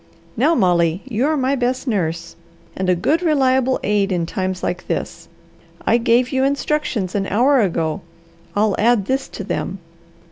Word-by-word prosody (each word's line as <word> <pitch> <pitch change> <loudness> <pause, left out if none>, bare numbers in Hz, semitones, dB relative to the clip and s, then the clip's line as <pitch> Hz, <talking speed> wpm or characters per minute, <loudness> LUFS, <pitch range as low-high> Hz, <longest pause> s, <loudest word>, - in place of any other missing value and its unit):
Now 295 +8 +3
Molly, 175 - +2
you 250 +2 0
are 310 0 +1
my 270 +1 +1
best 255 +1 -1
nurse, 170 -6 -2 0.4
and 185 -1 -2
a 180 - +4
good 305 - +1
reliable 265 -5 +2
aid 205 -1 +1
in 175 -2 0
times 185 +1 -3
like 180 0 -3
this. - - -4 0.6
I 235 - +4
gave 240 +1 +2
you 265 -1 +1
instructions 275 -8 -1
an 195 -1 -1
hour 255 +7 +3
ago. 165 -2 -1 0.5
I'll 210 -1 +2
add 225 -2 +3
this 265 +5 -1
to - - -7
them. - - -3
225 Hz, 165 wpm, -20 LUFS, 185-265 Hz, 0.6 s, a